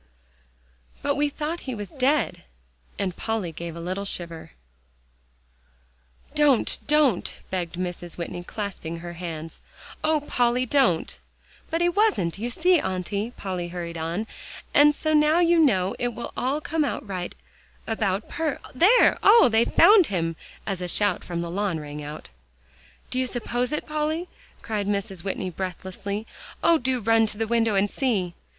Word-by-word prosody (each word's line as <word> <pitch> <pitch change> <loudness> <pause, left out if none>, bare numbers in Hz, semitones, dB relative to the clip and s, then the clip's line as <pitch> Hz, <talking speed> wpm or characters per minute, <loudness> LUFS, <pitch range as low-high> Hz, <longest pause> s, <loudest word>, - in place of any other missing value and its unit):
"But 285 - +2
we 290 +1 +1
thought 305 +4 -3
he 255 - -2
was 205 -3 -7
dead," 280 +3 +1 0.6
and 185 -3 -2
Polly 220 -6 -2
gave 170 +1 -7
a - - -7
little 185 +4 -3
shiver. 170 - -4 1.8
"Don't 295 -5 +3
don't," 295 -9 +3 0.2
begged 180 -2 -2
Mrs. 175 -1 -5
Whitney, 175 0 -5
clasping 180 -4 -5
her 175 0 -7
hands; 165 -2 -7 0.4
"Oh, 310 -1 +3
Polly! 245 -2 +1
don't." 230 - +1 0.5
"But 330 +1 -1
he 345 - +4
wasn't, 350 - +1
you 235 +3 -2
see, 355 +7 +3
Auntie," 190 +3 -2
Polly 180 -3 -3
hurried 170 -1 -6
on, 165 +6 -2 0.5
"and 295 0 +6
so 310 +1 0
now 305 +2 +4
you 340 -1 +4
know 190 - +3
it 245 -2 -1
will 235 - -5 0.3
come 315 +1 0
out 285 - -2
all - - -16
right 185 -3 -4 0.5
about 215 -2 -1
Per 320 -4 -2 0.2
There! 400 - +5
Oh! 425 - +7
they've 225 +1 +3
found 405 -4 +7
him!" 165 -4 -1 0.3
as 195 -3 -3
a 180 - -2
shout 205 +3 +1
from 170 -1 -3
the 170 0 -4
lawn 190 -3 -1
rang 150 0 -7
out. 150 +1 -8 0.8
"Do 255 - -1
you 260 - +1
suppose 245 0 -2
it, 300 - -2
Polly?" 310 +3 -2 0.3
cried 210 -3 -2
Mrs. 200 -3 -2
Whitney, 190 -1 -3
breathlessly. 190 +3 -5 0.4
"Oh! 335 -1 +5
do 255 0 0
run 225 +1 +4
to 210 - -5
the 225 - 0
window 225 -1 +2
and 195 +1 +3
see!" 205 -8 -1
210 Hz, 155 wpm, -25 LUFS, 180-285 Hz, 1.8 s, Oh